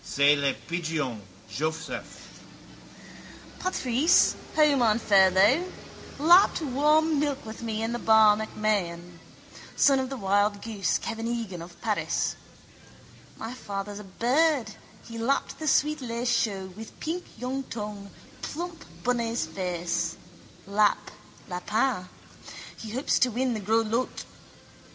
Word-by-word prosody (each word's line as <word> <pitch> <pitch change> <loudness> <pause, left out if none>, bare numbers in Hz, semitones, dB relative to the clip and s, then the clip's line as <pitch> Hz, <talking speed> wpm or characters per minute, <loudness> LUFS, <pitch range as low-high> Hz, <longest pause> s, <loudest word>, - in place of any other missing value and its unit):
_ - - -26
—C'est 140 +1 +4
le 140 -2 0
pigeon, 160 -9 -2 0.3
Joseph. 155 +10 -5 1.2
Patrice, 315 -1 +3 0.2
home 300 -4 +4
on 220 -2 +4
furlough, 205 - +4 0.5
lapped 345 +7 +6
warm 300 +3 +3
milk 285 -3 -1
with 220 +1 -8
me 225 -1 -3
in 230 +1 -2
the 240 - -2
bar 220 -2 +6
MacMahon. 185 -6 -2 0.6
Son 275 -2 +4
of 260 -1 -2
the 270 - -5
wild 205 0 +1
goose, 215 -4 0
Kevin 225 +1 -4
Egan 225 -7 -4
of 170 +1 -12
Paris. - - -1 1.0
My 225 +2 -6
father's 205 -3 -6
a - - -8
bird, 245 - +1 0.4
he 230 0 -7
lapped 265 +5 -1
the 310 - -4
sweet 300 +1 +2
lait 235 -1 -4
chaud 195 -6 0
with 220 +1 -11
pink 345 +3 -3
young 255 +3 -3
tongue, 210 -3 -6 0.3
plump 340 +2 -6 0.2
bunny's 235 -5 0
face. 170 -1 -2 0.5
Lap, 205 +1 +1 0.4
lapin. 210 +2 -1 0.7
He 220 - -9
hopes 255 +6 0
to 255 - +4
win 250 +3 -1
in - - 0
the 220 - -3
gros 220 +3 +1
lots. 230 +4 -2
225 Hz, 130 wpm, -27 LUFS, 195-260 Hz, 1.2 s, lapped